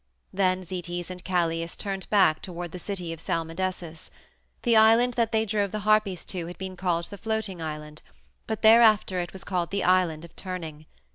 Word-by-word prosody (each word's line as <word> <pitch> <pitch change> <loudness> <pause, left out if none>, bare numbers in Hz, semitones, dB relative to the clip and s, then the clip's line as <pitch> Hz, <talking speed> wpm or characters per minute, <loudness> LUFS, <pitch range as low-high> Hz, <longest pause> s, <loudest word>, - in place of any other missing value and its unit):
Then 185 -1 +1
Zetes 175 0 -5
and 180 -1 -8
Calais 165 -2 0
turned 195 -2 -4
back 190 -7 +4
toward 175 -2 -6
the 180 - -7
city 180 -4 -4
of 165 - -10
Salmydessus. 165 0 -4 0.5
The 235 -2 +3
island 225 +3 +6
that 230 -2 +1
they 220 0 +2
drove 205 -1 0
the 215 - -3
Harpies 210 -3 +2
to 175 -3 -5
had 175 - -8
been 190 -1 -6
called 175 -2 -1
the 200 - -8
Floating 220 -5 -3
Island, 150 -1 -6 0.5
but 220 -1 -4
thereafter 220 -4 +6
it 175 -1 -3
was 190 - -7
called 175 -3 -2
the 200 +1 -1
Island 175 -3 +2
of 170 - -17
Turning. 160 -5 -6
185 Hz, 185 wpm, -26 LUFS, 170-205 Hz, 0.5 s, island